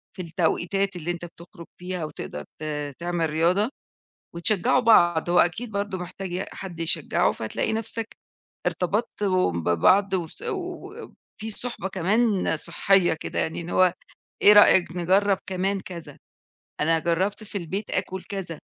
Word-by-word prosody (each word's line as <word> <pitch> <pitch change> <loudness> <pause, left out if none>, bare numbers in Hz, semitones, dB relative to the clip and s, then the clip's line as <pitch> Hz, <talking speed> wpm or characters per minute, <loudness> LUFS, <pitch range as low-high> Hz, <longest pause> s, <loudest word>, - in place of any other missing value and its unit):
في 185 - -5
التوقيتات 180 +3 -1
اللي 175 0 -3
أنت 175 0 -6
بتخرُج 170 +1 -13
فيها، 180 -2 -4
وتقدر 155 - -7
ت - - -10 0.4
تعمل 170 -2 -1
رياضة، 175 +8 +2 0.7
وتشجعوا 195 +7 +3
بعض، 175 -7 +4
هو 175 - +4
أكيد 220 +7 +1
برضه 200 -2 -3
محتاج 180 +1 -7
ي 185 +2 -2
حد 175 -4 -8
يشجعه، 165 - +2
فتلاقي 220 - -3
نفسك 225 0 -4 0.5
ارتبطتم 185 - 0
ببعض 190 - +3
وس 170 -4 -4
وفي 365 - -7
صُحبة 220 -3 -2
كمان 195 0 +1
صحية 175 +2 +2
كده 160 - -6
يعني 160 - -1
إن 170 - -7
هو، 185 -1 +4 0.5
إيه 210 - +9
رأيك 185 -4 +6
نجرب 190 +3 +2
كمان 190 +1 -1
كذا 170 -3 -9 0.6
أنا 165 +1 +3
جربت 185 +6 -1
في 205 -1 -5
البيت 190 +5 -4
آكُل 185 0 -2
كذا، 180 -6 -5
185 Hz, 140 wpm, -25 LUFS, 170-205 Hz, 0.7 s, إيه